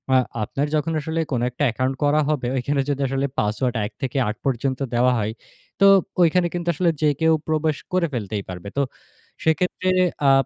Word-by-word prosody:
আ - - +7 0.3
আপনার 135 +7 -1
যখন 155 +2 0
আসলে 160 +2 -3
কোনো 120 -3 0
একটা 125 +4 -4
অ্যাকাউন্ট 130 +3 -1
করা 145 +1 +3
হবে, 145 -5 0
ওইখানে 135 +2 0
যদি 140 -1 -1
আসলে 135 +1 -1
পাসওয়ার্ড 115 +4 0
১ - - -6
থেকে 135 +1 -2
৮ 105 - -2
পর্যন্ত 130 0 0
দেওয়া 125 +2 +4
হয়, 105 0 -1 0.5
তো 200 - +6 0.4
ঐখানে 175 +1 +4
কিন্তু 175 -1 -4
আসলে 170 +2 +1
যে 155 - +4
কেউ 160 0 +5
প্রবেশ 155 -1 +1 0.2
করে 180 -2 +2
ফেলতেই 105 -3 -3
পারবে। 90 +2 -7
তো - - +3 0.6
সেক্ষেত্রে 180 +3 +1 0.4
আ - - +7
140 Hz, 185 wpm, -22 LUFS, 125-160 Hz, 0.6 s, আ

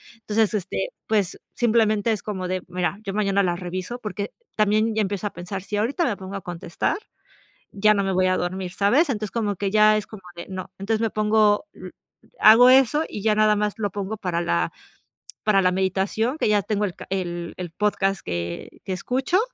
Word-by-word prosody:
Entonces, 220 -1 0
este, 205 - -2 0.2
pues, 205 -4 0
simplemente 225 -2 +2
es 210 - -5
como 190 -3 -4
de: 185 0 -2
"Mira, 180 +2 -1
yo 195 -2 -4
mañana 200 -1 +2
las 175 -1 -1
reviso", 185 +6 -5
porque 205 -2 -5 0.2
también 215 +1 +2
ya 220 - +2
empiezo 200 0 -2
a - - -6
pensar, 180 +2 -6
si 205 - -4
ahorita 260 - 0
me 235 - 0
pongo 190 +1 -8
a 195 - -4
contestar, 175 - -3 0.7
ya 210 +2 +4
no 200 - +1
me 195 - 0
voy 185 0 +2
a 185 - +2
dormir, 180 +1 -3
¿sabes? 255 - +3
Entonces, 215 -5 -2
como 210 -4 -1
que 200 +2 -2
ya 215 0 +6
es 210 - -4
como 205 -4 -11
de 170 - -8
no, 185 0 -6
entonces 220 +3 -1
me 225 -2 0
pongo, 210 +1 +3
mm, - - -9 0.5
hago 230 +3 +8
eso 270 +4 +5
y 210 - -6
ya 215 -1 +3
nada 215 0 +4
más 210 0 -1
lo 205 -3 -2
pongo 205 +2 -4
para 180 -4 -2
la 85 - 0 0.7
para 200 -2 +4
la 180 - +4
meditación, 195 - 0
que - - 0
ya 205 -1 +3
tengo 210 +1 -1
el 180 - -5
ca - - -11
el, 175 -3 -3
el 180 -2 -6
podcast 195 0 0
que, 85 -1 -5
que 190 - -2
escucho. 260 - 0
205 Hz, 205 wpm, -23 LUFS, 185-215 Hz, 0.7 s, hago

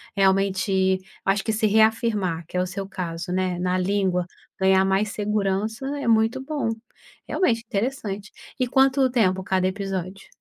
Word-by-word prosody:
realmente 190 -1 +2 0.3
acho 195 +1 +1
que 220 - -1
se 215 0 +2
reafirmar 215 -5 +2
que 180 - -5
é - - +2
o - - 0
seu 195 +1 -5
caso, 180 -2 -5
né, 185 -1 0
na 180 0 0
língua, 185 -1 0 0.3
ganhar 190 0 +4
mais 195 +2 +1
segurança 210 +3 -1
é 260 - -4
muito 225 +3 +3
bom, 285 -5 -2 0.6
realmente 230 -11 +1
interessante. 210 -2 -3 0.3
E 255 - +1
quanto 265 0 +3
tempo 190 -6 +2
cada 185 -1 +1
episódio? 195 -1 -4
195 Hz, 150 wpm, -24 LUFS, 185-220 Hz, 0.6 s, ganhar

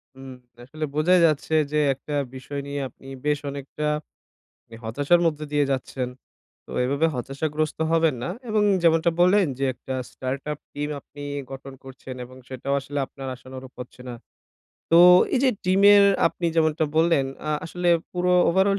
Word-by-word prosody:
হুম। 135 0 -10 0.3
আসলে 155 +4 -6
বোঝাই 175 +5 +4
যাচ্ছে 155 0 -1 0.2
যে 150 - +1 0.2
একটা 145 +2 -7 0.2
বিষয় 140 +2 -6
নিয়ে 140 0 -4
আপনি 135 - -19 0.2
বেশ 150 0 +2
অনেকটা 140 +2 -5 1.0
হতাশার 145 +10 +2
মধ্যে 150 -2 -1
দিয়ে 145 -1 +2
যাচ্ছেন। 130 -1 -3 0.6
তো - - -22 0.2
এভাবে 140 +5 +1
হতাশাগ্রস্ত 150 +5 -3
হবেন 165 -4 +3
না। - - -3 0.2
এবং 215 -1 +2 0.2
যেমনটা 165 0 +4
বললেন 185 +2 +5
যে - - -1
একটা 130 +2 -7 0.2
স্টার্ট-আপ 140 +3 -4
টিম 145 +1 -3
আপনি 145 +1 -14 0.3
গঠন 135 0 -8
করছেন 130 -1 -10
এবং 130 +1 -14
সেটাও 130 +2 -3
আসলে 140 +1 -5
আপনার 135 -1 -9
আশানুরূপ 130 +1 -11
হচ্ছে 125 0 -9
না। - - -5 0.8
তো 165 - +6 0.4
এই - - +3
যে 260 - +5
টিমের 200 +2 +6 0.2
আপনি 170 +1 -2
যেমনটা 160 0 +2
বললেন, 160 -4 +3 0.2
আ - - +1
আসলে 175 +2 -2 0.2
পুরো 180 0 +1 0.2
ওভারঅল 190 +3 +3
150 Hz, 155 wpm, -24 LUFS, 135-165 Hz, 1.0 s, তো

